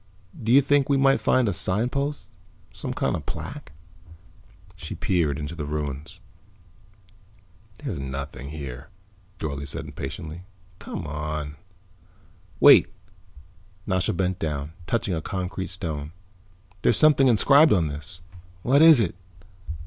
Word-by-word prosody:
"Do 115 +1 -1
you 135 +3 +7
think 140 0 +2
we 140 - +3
might 135 0 +3
find 130 -3 +3
a 100 - 0
signpost? 125 - -1 0.5
Some - - -5
kind - - -1
of - - -7
plaque?" - - -7 1.0
She 85 -4 -7
peered 80 -7 0
into 75 +2 -5
the 80 -3 -5
ruins. 75 +3 -5 1.6
"There's 110 - -5
nothing 70 0 -6
there," 70 -3 -8 0.5
Dorle 70 -4 -4
said - - -5
impatiently. 80 +2 -7 0.4
"Come - - -6
on." 75 0 -4 1.0
"Wait." - - +8 1.0
Nasha 95 +1 0
bent 95 +1 -1
down, 75 -1 -3
touching 110 -5 -1
a 80 - -2
concrete 95 0 -4
stone. 80 -4 -5 0.7
"There's - - +3
something 150 -3 +5
inscribed 140 +6 +6
on 90 -6 +3
this." 75 +5 -8 0.4
"What 140 +4 +4
is 160 -4 +8
it?" 95 -7 0
85 Hz, 125 wpm, -25 LUFS, 75-115 Hz, 1.6 s, Wait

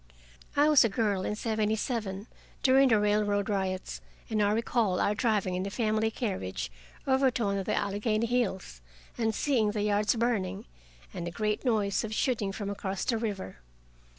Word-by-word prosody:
I 290 +1 +5
was 300 -4 +7
a 230 - +2
girl 200 -2 0
in 210 - -1
seventy 220 -1 0
seven, 210 -4 -3 0.4
during 270 0 +5
the 220 -3 +4
railroad 205 0 +1
riots, 190 -2 -2 0.3
and 215 -1 +1
I 205 0 +3
recall 220 -3 +1
our 205 - +2
driving 210 -4 0
in 180 - -1
the 195 - -3
family 220 0 0
carriage 95 - -3 0.3
over 265 0 +3
to 240 -3 -2
one 200 0 0
of 190 - -5
the - - +1
Allegheny 215 +2 0
hills, 210 - -2 0.3
and 225 -2 0
seeing 245 -7 +2
the 210 -1 -1
yards 210 +2 +2
burning, 225 - -1 0.5
and 170 - -4
a - - -1
great 210 +3 -2
noise 215 -6 +1
of 220 -1 -4
shooting 215 -6 0
from 200 +1 -5
across 195 -1 -3
the 230 -3 0
river. 205 - -4
210 Hz, 180 wpm, -29 LUFS, 200-230 Hz, 0.5 s, was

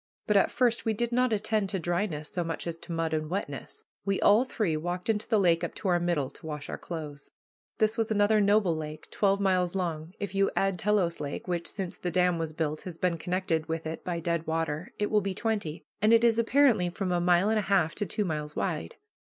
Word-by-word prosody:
But 210 - +1
at 195 - +5
first 240 -2 +1
we 225 - +1
did 235 +2 -1
not 250 0 +2
attend 215 -1 +1
to 195 - -1
dryness 175 -3 -2
so 175 - -2
much 165 -1 -4
as 165 -1 -4
to 170 - -9
mud 165 -1 -1
and 155 -1 -1
wetness. 165 -7 -5 0.2
We 195 0 0
all 210 +4 +5
three 215 -10 -1
walked 175 +6 -1
into 210 -1 -3
the 225 - +3
lake 170 -3 +3
up - - -3
to 195 - -2
our 175 -1 +3
middle 170 -6 0
to - - -15
wash 150 -1 -5
our - - -4
clothes. 150 -4 -7 0.5
This 215 +1 +2
was 225 0 0
another 210 0 +3
noble 200 -4 +3
lake, 155 0 -7
twelve 200 -1 +2
miles 185 -2 +1
long; 170 -1 -3
if 200 -1 -4
you 195 0 +3
add 195 -2 +1
Telos 195 -4 +1
Lake, 145 +4 -5
which, 175 -2 -2
since 190 -4 -5
the 180 - -3
dam 180 0 +2
was 160 -1 -2
built, 155 -1 -2
has 175 -3 -8
been 170 -2 0
connected 175 -2 -1
with 160 0 -3
it 160 +1 -5
by 175 -2 -2
dead 170 -1 -2
water, 160 0 -2
it 210 - -1
will 210 -1 +4
be 195 -1 -3
twenty; 205 -9 -2 0.2
and 215 +1 +4
it 230 0 +5
is 230 -1 +4
apparently 235 -6 +4
from 185 +1 -3
a 175 -1 +1
mile 175 +3 +4
and 220 0 +2
a 200 - -4
half 175 -5 +3
to 205 - -2
two 210 +4 -1
miles 150 -3 -3
wide. 85 -4 -2
180 Hz, 235 wpm, -28 LUFS, 165-210 Hz, 0.5 s, at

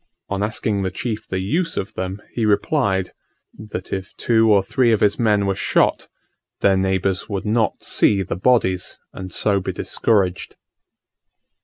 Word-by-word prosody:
On 100 0 -2
asking 105 -1 -1
the 95 - -1
chief 110 +3 -4
the 95 - -3
use 165 - -1
of 95 - -3
them, 95 +2 -5
he 115 - -2
replied, 100 -3 +1 0.4
that 105 -4 -7
if 95 +1 -5
two 115 -2 +3
or 100 -2 +4
three 120 +4 +2
of 110 - +3
his 105 -1 +2
men 105 -3 +2
were 100 - +1
shot, - - +1 0.5
their 100 -1 +4
neighbours 95 0 0
would 100 -1 -3
not 110 +1 0
see 100 -2 +2
the 95 - -4
bodies, 95 -3 +1 0.2
and 95 -1 -8
so 100 +2 +1
be 95 - -3
discouraged. 95 -5 0
100 Hz, 160 wpm, -21 LUFS, 95-110 Hz, 0.5 s, or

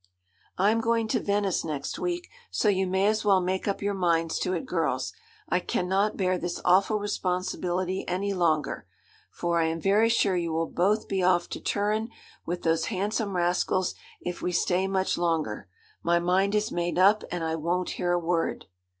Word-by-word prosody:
'I'm 215 +4 +3
going 230 0 +1
to - - +1
Venice 200 -2 0
next 150 -4 -4
week; 350 0 -2 0.2
so - - 0
you 190 -1 +1
may 190 +2 +1
as 215 +1 +2
well 200 -3 +4
make 185 +2 -2
up 200 0 -1
your 205 0 0
minds 165 -3 +1
to - - -1
it, 260 - -2
girls. - - -1 0.3
I - - +2
cannot 190 +4 0
bear 185 -2 +1
this 175 0 -3
awful 195 +4 +4
responsibility 185 -2 -2
any 195 +3 -1
longer; 160 -6 0 0.4
for 170 -1 -1
I - - +2
am 160 +1 -1
very 205 +5 +3
sure 205 -4 +2
you 170 -2 -1
will 165 +1 +1
both 205 +5 +1
be 190 -1 -1
off 180 -1 +2
to - - -5
Turin 215 +2 -1 0.4
with 175 +1 -3
those 165 0 +2
handsome 205 0 -2
rascals 180 +1 +1 0.3
if 180 0 -5
we 180 - -1
stay 180 +2 +1
much 190 -2 0
longer. 160 - -1 0.3
My 170 0 +2
mind 185 +4 +2
is 210 0 0
made 175 0 -1
up, 200 +4 +5
and 175 -2 -2
I 160 0 -1
won't 170 +3 -1
hear 175 -1 +1
a 175 - +3
word.' 170 -1 -1
185 Hz, 185 wpm, -27 LUFS, 175-200 Hz, 0.4 s, up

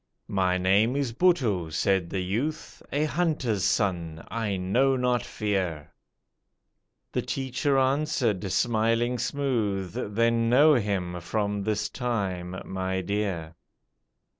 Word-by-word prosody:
"My 90 -2 +2
name 100 +7 +3
is 140 -5 -1
Buttoo," 120 - +2
said 85 +2 +1
the 95 - -2
youth, 125 +12 -3
"A 145 +2 +1
hunter's 150 - 0
son, 85 -6 0
I 110 -4 -1
know 125 +9 +2
not 125 -1 +1
Fear;" 95 -8 -3 1.2
The - - 0
teacher 135 +1 -1
answered, 130 -8 +1
smiling 115 +2 +1
smooth, 110 -10 -1 0.2
"Then 115 0 +2
know 145 +6 +6
him 95 -7 -1
from 105 +2 -1
this 105 0 -1
time, 95 -7 -3
my 95 0 -2
dear." 95 -5 -2
105 Hz, 115 wpm, -27 LUFS, 95-125 Hz, 1.2 s, know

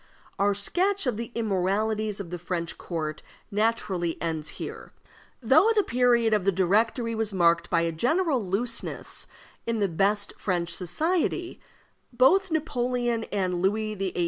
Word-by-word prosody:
Our 200 0 +3
sketch 370 - 0
of 250 -4 0
the 230 +2 -5
immoralities 215 0 0
of 180 -4 -7
the 180 - -4
French 170 -1 -4
court 155 -3 -4 0.3
naturally 200 -5 0
ends 160 -2 -3
here. - - -7 0.5
Though 275 - +5
the 420 - +4
period 240 -4 +3
of 210 -3 +2
the 195 - +3
Directory 220 +6 +1
was 220 -1 -1
marked 170 -2 +2
by 165 - +2
a 170 0 0
general 265 - +1
looseness 220 +6 -2 0.4
in 230 -1 0
the 205 -2 +2
best 200 +4 +1
French 175 -3 -1
society, 330 - -1 0.5
and 240 - -22
both 375 +10 +5
Napoleon 245 -7 -1
and 185 -3 -1
Louis 215 +3 0
XVIII. 195 -2 -3
210 Hz, 145 wpm, -26 LUFS, 180-245 Hz, 0.5 s, Though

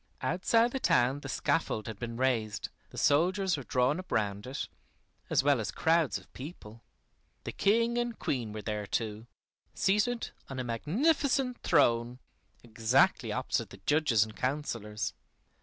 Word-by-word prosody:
Outside 225 +7 +2
the 265 - -2
town 125 - +3
the - - -8
scaffold 135 -9 0
had 110 -3 -7
been 115 -1 -5
raised, 120 -5 0 0.2
the - - -13
soldiers 180 +6 +3
were 145 - -5
drawn 130 +5 +1
up 185 - -10
round 100 +1 -1
it, 130 - -4 0.6
as - - +3
well 140 -3 +4
as 110 - -2
crowds 165 -2 +2
of - - -16
people. 120 -6 -10 0.6
The - - -4
King 230 +3 +2
and 240 -2 -2
Queen 120 -6 -2
were 105 0 -6
there 105 -1 -3
too, 110 +1 -3 0.5
seated 210 - +1 0.2
on 135 - -6
a - - -1
magnificent 250 - +1
throne, 120 +1 +3 0.5
exactly 120 - +2
opposite 120 -2 -1
the 95 - -12
judges 145 -8 +3
and 110 0 -9
councilors. 120 -5 -2
130 Hz, 150 wpm, -30 LUFS, 115-185 Hz, 0.6 s, well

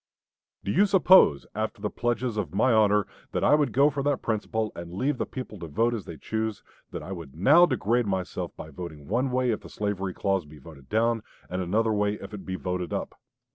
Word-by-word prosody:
Do 100 - -2
you 200 - +4
suppose, 185 - +6
after 110 +1 -3
the 105 0 -3
pledges 120 -1 -1
of 105 -3 -3
my 120 +4 +4
honor 105 -2 +4 0.3
that - - 0
I - - +5
would 150 -1 +3
go 140 +3 +4
for 140 0 -2
that 145 -1 0
principle 110 -1 -1
and 85 0 -7
leave 130 +9 -1
the - - -1
people 125 -6 -7
to 85 - -6
vote 115 +10 +1
as 110 -5 -4
they 80 - -8
choose, 110 +6 -3 0.3
that - - -6
I - - -8
would 85 -7 -8
now 150 - +6
degrade 120 -3 +1
myself 95 -2 -2
by 80 - -8
voting 80 -3 -8
one 125 +6 +1
way 125 -1 +1
if 110 - -1
the - - -12
slavery 100 -3 -3
clause 95 -2 0
be 75 +1 -14
voted 70 -2 -14
down, 115 +1 +2 0.3
and 90 +1 -1
another 110 +5 +1
way 105 0 +1
if 100 0 -10
it 105 - -8
be 95 - -2
voted 90 -2 -3
up? - - -3
105 Hz, 220 wpm, -27 LUFS, 90-120 Hz, 0.3 s, suppose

